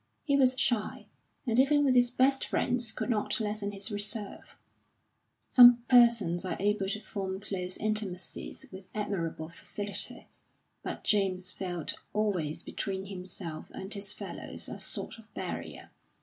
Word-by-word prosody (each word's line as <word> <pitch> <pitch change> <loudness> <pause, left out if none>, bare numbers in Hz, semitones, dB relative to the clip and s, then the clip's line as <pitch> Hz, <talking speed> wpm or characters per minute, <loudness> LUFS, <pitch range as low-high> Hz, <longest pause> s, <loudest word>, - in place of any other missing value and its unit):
He 280 - +2
was 260 -1 +4
shy, 235 -6 0 0.4
and 235 -1 +2
even 290 +2 +5
with 265 - +4
his 245 -1 +5
best 265 +2 +3
friends 245 -2 0
could - - -3
not 210 0 +1
lessen 210 -1 -2
his 200 +1 -3
reserve. 205 0 -2 0.9
Some 245 -1 +9
persons 235 -8 +5
are 185 -3 -2
able 205 -1 +1
to 215 - -1
form 195 -3 -4
close 185 -3 -3
intimacies 210 -4 -3
with 190 0 -9
admirable 170 -6 -2
facility, 200 +4 -4 0.6
but - - -5
James 185 -3 +3
felt 175 -4 -4 0.2
always 190 -8 0
between 190 -2 -4
himself 180 -4 -7
and 190 +2 -5
his 200 -1 -4
fellows - - -6
a - - -7
sort - - -4
of - - -18
barrier. - - -5
205 Hz, 140 wpm, -30 LUFS, 190-235 Hz, 0.9 s, Some